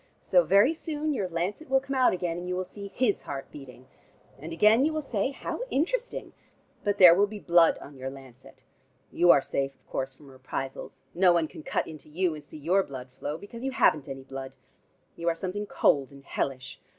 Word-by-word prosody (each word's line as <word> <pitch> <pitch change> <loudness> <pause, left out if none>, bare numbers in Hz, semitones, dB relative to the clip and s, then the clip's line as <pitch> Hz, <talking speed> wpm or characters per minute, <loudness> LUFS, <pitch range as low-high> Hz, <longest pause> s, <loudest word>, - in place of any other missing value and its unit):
So, 180 - +4
very 200 - +5
soon, 310 -2 -3
your 195 -8 -2
lancet 185 - -3
will 270 0 +4
come 270 +1 -5
out 255 -1 +5
again, 175 -2 -2
and 175 +1 -5
you 180 - -1
will 185 - -1
see 200 +2 -9
his 215 +1 0
heart 135 -1 -7
beating. 130 -3 -12 0.5
And 155 +4 -8
again 210 +9 +5
you 310 - +2
will 310 -1 -2
say, 230 -3 -1
'How 275 - -5
interesting!' 480 - -2 0.5
But 205 -1 0
there 180 -3 +10
will 200 +4 +3
be 210 +1 -8
blood 170 -3 +4
on 140 -1 -12
your 130 0 -5
lancet. 135 -2 -14 0.5
You 175 - +3
are 140 - +7
safe, 135 0 -2
of - - -37
course, 135 0 -4
from 140 -1 -16
reprisals. 130 +1 -6
No 180 0 +5
one 165 -2 +2
can - - -11
cut - - -1
into 155 -1 -11
you, 175 +2 0
and 150 -1 -9
see 150 - -11
your 175 +7 +2
blood 130 -7 -8
flow, 150 +2 -3
because 230 +6 -10
you 270 - 0
haven't 155 - +2
any 135 0 -7
blood. 135 0 -8 0.6
You 170 0 -1
are 165 - 0
something 195 +4 -4
cold 140 -7 +2
and 140 0 -15
hellish. 130 -2 -4
170 Hz, 210 wpm, -28 LUFS, 140-205 Hz, 0.6 s, there